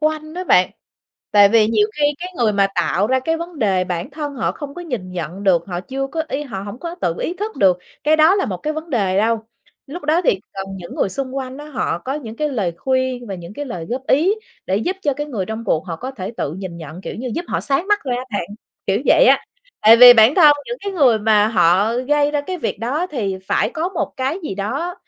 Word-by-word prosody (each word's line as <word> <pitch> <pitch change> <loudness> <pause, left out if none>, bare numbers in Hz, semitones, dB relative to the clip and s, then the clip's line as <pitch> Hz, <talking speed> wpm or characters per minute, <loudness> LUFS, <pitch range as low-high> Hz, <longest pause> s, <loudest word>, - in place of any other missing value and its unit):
quanh 310 +1 -2
đó 365 +1 -4
bạn, 180 - +4 0.6
tại 205 -1 +7
vì 220 0 +4
nhiều 210 -2 +3
khi 290 - +4
cái 365 +1 -6
người 220 -3 +2
mà 200 -1 +3
tạo 200 +4 +1
ra 260 +2 +2
cái 325 +4 -1
vấn 335 -2 -7
đề 190 -5 +1
bản 175 - -4
thân 290 0 -5
họ 240 - -1
không 285 -1 -8
có 350 - -7
nhìn 220 - -5
nhận 175 +3 -5
được, 175 -2 +3
họ 175 -2 -4
chưa 270 +5 -4
có 320 +3 -3
y 280 +2 -2
họ 200 -9 -6
hổng 205 +4 -8
có 340 +2 -6
tự 170 -1 0
ý 345 - -2
thức 420 +4 -5
được 185 -3 +4 0.3
cái 310 +1 +4
đó 315 +5 +6
là 395 - +1
một 185 -4 -3
cái 305 - -3
vấn 315 +1 -7
đề 195 -6 +1
đâu. 225 +1 +1 0.4
Lúc 295 +3 -8
đó 320 +4 +2
thì 190 - +2
cần 195 0 -4
những 175 -2 -9
người - - 0
xung 270 +3 -4
quanh 260 0 -5
đó 295 - -9
họ 250 - -2
có 265 +9 -4
những 230 -6 -7
cái 300 0 -1
lời 205 -11 -1
khuyên 260 -2 -1
và 195 - -5
những 175 +3 -10
cái 290 - -5
lời 175 -11 -6
góp 260 +2 -4
ý 340 +10 +3 0.3
để 190 - +1
giúp 360 - -1
cho 285 -3 +1
cái 295 +1 -4
người 215 -10 -3
trong 220 +1 -5
cuộc 160 -1 0
họ 165 -2 -4
có 260 +7 -6
thể 195 -7 -6
tự 145 - -3
nhìn 185 -3 -7
nhận, 160 +1 -9
kiểu - - -6
như, 250 +2 -5
giúp 345 - -3
họ - - -1
sáng 290 +7 -1
mắt 415 0 +3
ra 250 -2 -1
á 250 - -4
bạn, 200 -4 -2 0.4
kiểu 195 +3 +1
vậy - - +6
á. - - +4 0.4
Tại 225 +2 +8
vì 245 0 +11
bản 225 +4 +6
thân 305 -5 +7
những 485 - -4
cái 400 - -2
người 260 -10 +4
mà 215 0 +3
họ 195 +3 +3
gây 290 +3 +1
ra 295 -1 0
cái 365 +5 -5
việc - - -3
đó 290 +10 -1
thì 205 - -3
phải - - +1
có 330 +2 -2
một 375 - -3
cái 270 +6 -1
gì 195 - -4
đó 275 - -3
250 Hz, 260 wpm, -19 LUFS, 195-300 Hz, 0.6 s, vì